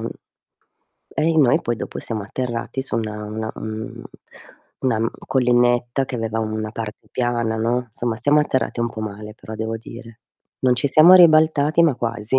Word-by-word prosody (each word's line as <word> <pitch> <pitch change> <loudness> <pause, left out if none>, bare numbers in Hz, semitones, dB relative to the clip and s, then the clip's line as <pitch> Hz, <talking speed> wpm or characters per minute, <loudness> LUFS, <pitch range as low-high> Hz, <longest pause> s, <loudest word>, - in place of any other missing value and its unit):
mhmm, - - -3 1.1
e 155 - 0
i 165 -1 +2
noi 135 -5 +4
poi 120 - -2
dopo - - -6
siamo 110 -3 -4
atterrati 120 +4 -4
su 130 - -4
una 105 -2 -4
una 110 +1 -4
un 110 0 -6 0.8
una 130 -4 +1
n 115 +1 0 0.2
collinetta 120 0 +2
che 130 - -6
aveva 115 -1 -2
una 110 0 -3
parte 110 -1 -7
piana, 120 -2 -1
no; 120 +3 0
somma, 115 +1 -3
siamo 145 +6 +3
atterrati 130 -4 -1
un 120 - 0
po' 110 - -8
male 105 0 -7
però 110 0 -10
devo 110 +1 -3
dire. 115 0 -12 0.4
Non 125 -1 +3
ci 125 +3 0
siamo 155 +6 +7
ribaltati 155 -2 +5
ma 160 -5 +3
quasi. 115 +1 -1
120 Hz, 175 wpm, -21 LUFS, 110-130 Hz, 1.1 s, siamo